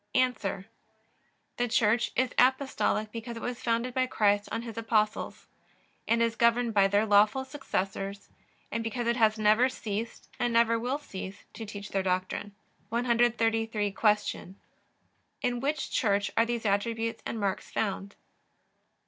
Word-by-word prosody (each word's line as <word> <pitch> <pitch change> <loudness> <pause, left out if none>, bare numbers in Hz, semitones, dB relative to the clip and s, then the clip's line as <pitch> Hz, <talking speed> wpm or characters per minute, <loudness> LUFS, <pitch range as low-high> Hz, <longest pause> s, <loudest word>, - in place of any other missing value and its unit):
A. 255 0 +4 1.3
The 245 - +1
Church 230 0 +2
is 255 0 +1
Apostolic 255 -4 +2
because 230 +1 -6
it - - -7
was 245 -1 -4
founded 235 +2 0
by 255 0 +1
Christ 205 -3 +2
on 230 - -2
His 230 -2 -7
Apostles, 220 -2 -1 0.6
and 230 +1 +3
is 230 -1 0
governed 235 0 +2
by 200 -2 +5
their 205 +2 +2
lawful 210 +5 +4
successors, 200 -7 -4 0.4
and 230 - -2
because 235 +2 -3
it 235 +1 +1
has 220 -2 +3
never 215 +4 +4
ceased, 225 -2 -5
and 240 - +1
never 230 0 +4
will 250 +4 -1
cease, 195 -8 -8
to 225 - -7
teach 205 0 -7
their 195 - 0
doctrine. 185 +2 -2 0.3
133. 225 -3 +1
Q. 210 -2 0 0.9
In 245 -1 0
which 280 +2 -2
Church 200 -3 +1
are 230 - +3
these 235 -1 -2
attributes 225 +3 0
and 225 - -4
marks 195 -2 -2
found? 200 -1 -3
225 Hz, 145 wpm, -29 LUFS, 205-240 Hz, 1.3 s, by